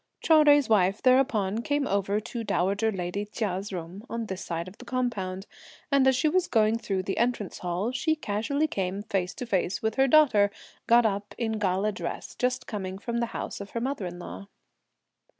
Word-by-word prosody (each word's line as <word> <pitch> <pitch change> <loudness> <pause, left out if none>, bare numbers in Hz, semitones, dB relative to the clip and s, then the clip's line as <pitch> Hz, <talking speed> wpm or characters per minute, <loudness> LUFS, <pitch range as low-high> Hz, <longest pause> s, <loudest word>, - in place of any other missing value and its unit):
Chou 315 -2 +5
Jui's 290 -3 +5
wife 200 -2 +3
thereupon 240 -6 +3
came 290 +3 0
over 200 -2 0
to 230 +2 -5
dowager 200 +2 +1
lady 185 +1 -3
Chia's 205 -2 -3
room 180 +2 -6
on 230 -1 -3
this 190 -3 -5
side 170 +1 -4
of 185 - -12
the - - -9
compound, 220 -7 -2 0.5
and 275 -1 +4
as 265 - +5
she 260 +5 +2
was 365 +3 +2
going 220 0 +2
through 195 -4 -2
the 195 - -2
Entrance 235 -4 -1
Hall, 180 +6 -2
she 290 +5 +1
casually 280 +3 -1
came, 195 -7 -2
face 195 -3 -2
to 250 - -5
face, 190 -3 -1
with 220 +2 -1
her 270 0 +5
daughter, 250 -9 +5 0.4
got 235 0 +6
up 205 -1 -2
in 220 -2 -1
gala 195 +1 +1
dress, 175 -4 -5
just 250 0 -1
coming 190 -3 -5
from 235 +4 -3
the 235 - 0
house 230 - -5
of 200 - -8
her - - +1
mother 250 -5 -2
in 175 0 -7
law. 100 - -8
215 Hz, 195 wpm, -27 LUFS, 190-250 Hz, 0.5 s, got